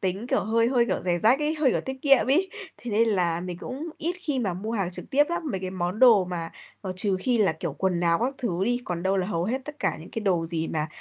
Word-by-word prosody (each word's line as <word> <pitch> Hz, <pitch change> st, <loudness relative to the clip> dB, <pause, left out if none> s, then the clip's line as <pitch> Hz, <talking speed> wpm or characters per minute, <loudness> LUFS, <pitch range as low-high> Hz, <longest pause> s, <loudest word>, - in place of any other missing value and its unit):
tính, 190 Hz, +4 st, -2 dB
kiểu, -, -, +1 dB
hơi 230 Hz, +2 st, +2 dB
hơi, 245 Hz, -2 st, +3 dB
kiểu, -, -, -1 dB
giẻ 175 Hz, -1 st, +1 dB
rách 230 Hz, +9 st, +4 dB
ấy, 300 Hz, +1 st, 0 dB
hơi, 300 Hz, -4 st, +2 dB
kiểu, -, -, 0 dB
tiết 265 Hz, 0 st, -5 dB
kiệm 275 Hz, -4 st, +5 dB
ấy, 345 Hz, +9 st, +2 dB, 0.3 s
thế 245 Hz, -, -7 dB
nên 225 Hz, +2 st, +3 dB
là 175 Hz, -5 st, +1 dB
mình 180 Hz, -1 st, -6 dB
cũng 275 Hz, -, -6 dB
ít 335 Hz, +4 st, -1 dB
khi 295 Hz, -6 st, -1 dB
mà 200 Hz, -8 st, -1 dB
mua 215 Hz, +5 st, -5 dB
hàng 195 Hz, -6 st, -1 dB
trực 180 Hz, -, -9 dB
tiếp 290 Hz, +2 st, +4 dB
lắm. 345 Hz, -, -2 dB
Mấy 190 Hz, -, -3 dB
cái 185 Hz, -, -4 dB
món 185 Hz, +1 st, -3 dB
đồ 225 Hz, -7 st, +7 dB
mà, 175 Hz, -2 st, -4 dB, 0.3 s
ờ, 190 Hz, -2 st, -4 dB
trừ 195 Hz, 0 st, 0 dB
khi 245 Hz, +2 st, +1 dB
là, 200 Hz, -6 st, +3 dB
kiểu, 160 Hz, 0 st, -4 dB
quần 175 Hz, +4 st, -1 dB
áo 170 Hz, -1 st, +3 dB
các 255 Hz, +4 st, -1 dB
thứ 190 Hz, -7 st, -1 dB
đi, 245 Hz, +3 st, 0 dB
còn 175 Hz, -1 st, -4 dB
đâu 190 Hz, +1 st, +1 dB
là 185 Hz, -1 st, 0 dB
hầu 170 Hz, -4 st, -1 dB
hết 245 Hz, +6 st, -1 dB
tất 300 Hz, +1 st, -9 dB
cả -, -, 0 dB
những 160 Hz, -, -11 dB
cái 225 Hz, -, -4 dB
đồ 180 Hz, -5 st, +1 dB
gì 165 Hz, -1 st, -2 dB
mà 155 Hz, -1 st, -1 dB
200 Hz, 290 wpm, -26 LUFS, 175-250 Hz, 0.3 s, đồ